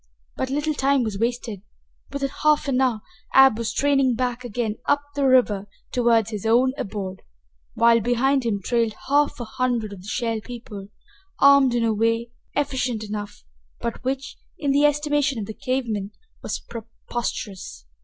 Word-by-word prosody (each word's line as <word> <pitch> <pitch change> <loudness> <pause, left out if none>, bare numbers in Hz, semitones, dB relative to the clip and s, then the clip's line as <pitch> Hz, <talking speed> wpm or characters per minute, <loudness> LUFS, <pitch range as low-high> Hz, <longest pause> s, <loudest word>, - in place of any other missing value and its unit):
But 260 - -2
little 295 +3 0
time 275 -2 +2
was 210 -3 -3
wasted. 230 -3 -2 0.5
Within 275 -1 -2
half 300 -1 +3
an 265 -1 +1
hour 245 -5 +1 0.3
Ab 270 -4 +7
was 230 - -1
straining 275 -3 +2
back 250 0 -2
again 225 -2 -3
up 285 0 +2
the 280 -1 +1
river 220 -6 +3 0.2
toward 230 -3 +3
his 210 -3 -5
own 245 +4 +3
abode, 195 -6 -5 0.5
while 230 0 +5
behind 250 +4 +2
him 210 -4 -1
trailed 230 -2 0
half 290 0 +2
a 240 - -4
hundred 235 -3 -1
of 190 - -10
the 190 - -12
Shell 230 0 -1
People, 230 -5 -8 0.5
armed 280 -3 +6
in 235 - +1
a 225 -1 +2
way 230 +2 0 0.2
effective 260 -6 -1
enough, 205 - -6 0.4
but 235 - -4
which, 270 +2 -3 0.2
in 285 -2 0
the 285 +2 +4
estimation 295 -2 +1
of 215 - -3
the 220 - -7
cave 255 +4 -1
men, 205 -3 -3 0.3
was - - -3
preposterous. 220 - -6
240 Hz, 165 wpm, -23 LUFS, 220-270 Hz, 0.5 s, Ab